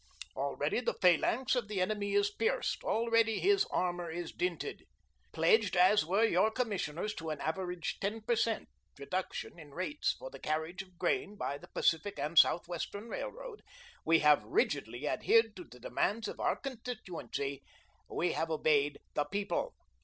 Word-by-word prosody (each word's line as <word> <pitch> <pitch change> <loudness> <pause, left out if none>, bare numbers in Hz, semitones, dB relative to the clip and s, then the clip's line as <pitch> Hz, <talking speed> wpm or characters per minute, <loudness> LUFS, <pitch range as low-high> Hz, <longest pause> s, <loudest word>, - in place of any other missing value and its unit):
Already 140 - -1
the 245 - -1
phalanx 205 +8 +3
of 240 -4 -1
the 210 -2 -2
enemy 200 +1 0
is 205 0 +3
pierced, 225 +2 -1
already 230 -1 +2
his 400 +1 +4
armour 175 - -1
is 170 +1 -5
dinted. 360 +1 -3 0.5
Pledged 445 - +3
as 185 +2 +6
were 195 +7 +2
your 210 -1 +4
commissioners 210 -5 -2
to 165 -5 -6
an 155 -2 -3
average 180 +2 -3
ten 210 +3 -2
per 235 +2 +1
cent. 225 -1 0 0.3
reduction 175 +4 -4
in 145 -3 -13
rates 290 - -1
for - - -8
the - - -10
carriage 160 +4 -2
of 185 -2 -16
grain 190 +3 0
by 140 -8 -3
the - - -13
Pacific 165 +4 +1
and 150 +3 +3
Southwestern 175 +6 +1
Railroad, - - -6 0.4
we 165 0 +4
have 150 -1 +5
rigidly 435 +6 -1
adhered 225 -2 +3
to 180 - -9
the 125 - -15
demands 210 - -1
of - - -7
our - - +1
constituency, 205 - -5 0.5
we 175 - 0
have 165 +1 -1
obeyed 150 -2 +2 0.2
the 145 - +1
People. 200 - -2
190 Hz, 160 wpm, -33 LUFS, 160-225 Hz, 0.5 s, as